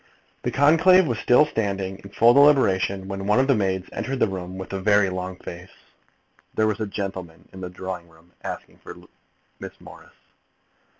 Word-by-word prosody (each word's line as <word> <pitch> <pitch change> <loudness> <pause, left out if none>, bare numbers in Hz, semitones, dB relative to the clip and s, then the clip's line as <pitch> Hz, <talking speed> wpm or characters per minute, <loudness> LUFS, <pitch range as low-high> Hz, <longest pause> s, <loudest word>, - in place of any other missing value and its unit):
The - - -2
conclave 165 +6 +5
was 120 -7 -2
still 125 +5 +4
sitting 100 -7 -3
in 100 - -12
full 115 +4 +4
deliberation, 100 -9 +3
when 95 0 -5
one 105 +4 +3
of 130 - +3
the 135 - +3
maids 95 -4 -1
entered 135 +1 -3
the 125 - +2
room 95 -1 -6
with 95 +1 -8
a 95 - -3
very 100 -1 +3
long 90 0 -5
face. 90 0 -10 0.9
There 110 - +2
was 110 -1 -1
a 110 - -2
gentleman 95 -5 -6
in 95 - -10
the 90 - -5
drawing 90 -1 -7
room 80 +1 -23
asking - - -7
for - - -11 0.6
Miss - - -10
Morris! - - -15
95 Hz, 180 wpm, -23 LUFS, 95-115 Hz, 0.9 s, conclave